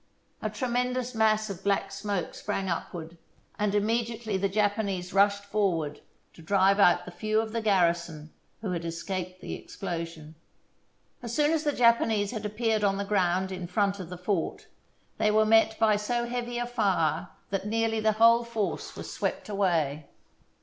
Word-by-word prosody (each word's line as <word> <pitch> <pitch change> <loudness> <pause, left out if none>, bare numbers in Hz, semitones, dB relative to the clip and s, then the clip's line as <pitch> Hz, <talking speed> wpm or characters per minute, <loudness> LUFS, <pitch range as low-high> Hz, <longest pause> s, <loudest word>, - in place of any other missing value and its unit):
A 215 - -1
tremendous 250 +2 -1
mass 215 -1 +2
of 190 0 -8
black 200 -1 0
smoke 195 -2 -3
sprang 195 -2 -3
upward, 170 -1 -5 0.4
and 210 -1 +1
immediately 225 0 0
the 195 +1 +1
Japanese 200 -3 -1
rushed 200 +1 +3
forward 185 -8 -1 0.3
to - - -14
drive 195 +3 +3
out 175 -3 +5
the 180 - -8
few 215 +4 0
of 220 0 -2
the 230 0 -2
garrison 170 -6 +1 0.3
who 200 -5 -2
escaped 180 +2 -4
the - - -5
explosion. 165 -4 -6 0.9
As 235 -1 -5
soon 300 0 +3
as 320 -2 +1
the 295 - +2
Japanese 230 -5 +3
had 215 -3 -3
appeared 220 0 0
on 195 -1 +2
the 200 - -2
ground 190 -2 +1
in 180 -2 -5
front 200 +2 0
of 180 -3 -7
the 180 - -7
fort 180 -1 -2 0.5
they 215 - +3
were 215 +1 +4
met 220 0 +4
by 215 -2 +4
so 235 +3 -1
heavy 240 0 -3
a 240 - -1
fire 200 -9 0 0.2
that 195 +1 -2
nearly 225 0 0
the 215 0 +2
whole 230 +2 +5
force 225 -3 -3
was - - -7
swept - - -3
away. 165 -8 0
205 Hz, 165 wpm, -28 LUFS, 180-225 Hz, 0.9 s, out